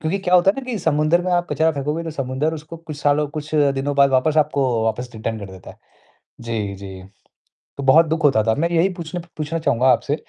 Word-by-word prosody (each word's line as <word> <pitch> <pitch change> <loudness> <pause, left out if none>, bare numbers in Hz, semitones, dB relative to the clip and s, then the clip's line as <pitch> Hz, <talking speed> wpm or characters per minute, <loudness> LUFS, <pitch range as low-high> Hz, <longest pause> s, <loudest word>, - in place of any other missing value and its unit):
क्योंकि 165 +5 -1
क्या 185 -2 0
होता 180 +2 +6
है 240 - -5
ना 265 - -11
कि 225 - -2
समुद्र 155 +2 +2
में 185 - -2
आप 175 0 +1
कचरा 160 0 +2
फेंकोगे 150 +3 -3
तो 165 - -4
समुद्र 135 +1 -2
उसको 160 +2 -9
कुछ 160 -2 -9
सालों 145 +1 +1
कुछ 155 +1 -5 0.2
दिनों 140 +1 -2
बाद 140 -1 +5
वापस 135 +4 +2
आपको 145 -2 +1 0.2
वापस 125 +2 -2
रिटर्न 110 0 -4
कर 100 -2 -8
देता 95 -1 -12
है। - - -17 0.6
जी, 110 -4 -3
जी। 95 -1 -9 0.8
तो 140 - -4
बहुत 155 +5 +6
दुःख 160 0 -2
होता 135 -7 +4
था, 110 0 +2
मैं 165 +3 0
यही 170 +2 +2
पूछने 175 0 -6
प - - -16
पूछना 155 +2 -3
चाहूँगा 130 -4 +1
आपसे 130 +4 +2
150 Hz, 235 wpm, -20 LUFS, 130-165 Hz, 0.8 s, होता